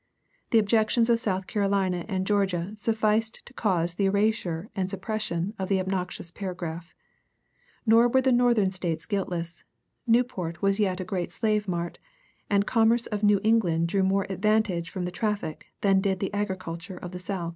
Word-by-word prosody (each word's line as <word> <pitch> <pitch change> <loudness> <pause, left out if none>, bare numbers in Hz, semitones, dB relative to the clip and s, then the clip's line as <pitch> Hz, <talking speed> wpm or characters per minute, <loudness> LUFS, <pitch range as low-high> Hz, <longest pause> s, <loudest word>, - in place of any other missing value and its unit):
The 230 - +4
objections 220 +2 +3
of 230 - +3
South 190 -4 -1
Carolina 195 -4 0
and 190 -3 -1
Georgia 195 -3 0
sufficed 220 0 0
to 240 - -15
cause 175 -8 0
the 195 +2 +1
erasure 200 -2 0
and 190 -2 -1
suppression 195 -1 -2
of 190 - -3
the 195 -1 +2
obnoxious 185 -2 -3
paragraph. 175 -3 -6 0.9
Nor 230 +1 +6
were 260 +2 +3
the 260 0 +2
Northern 240 -5 +3
States 170 -4 -2
guiltless: 175 -5 -3 0.4
Newport 225 -8 +1
was 195 +1 +1
yet 190 -3 +1
a - - -2
great 185 -1 -3
slave 215 -2 0
mart, 175 -1 -3 0.5
and 200 -1 +3
the - - -20
commerce 230 +1 +3
of 210 -2 -3
New 205 -1 +4
England 175 -7 +2
drew 195 +2 +1
more 195 +1 +2
advantage 190 -3 +1
from 180 0 -4
the 180 - -3
traffic 205 -5 -3
than 195 -1 +4
did 190 -1 0
the 195 +1 -3
agriculture 185 -3 -4
of 180 - -7
the 180 - -6
South. 180 -2 -3
195 Hz, 170 wpm, -27 LUFS, 180-215 Hz, 0.9 s, Nor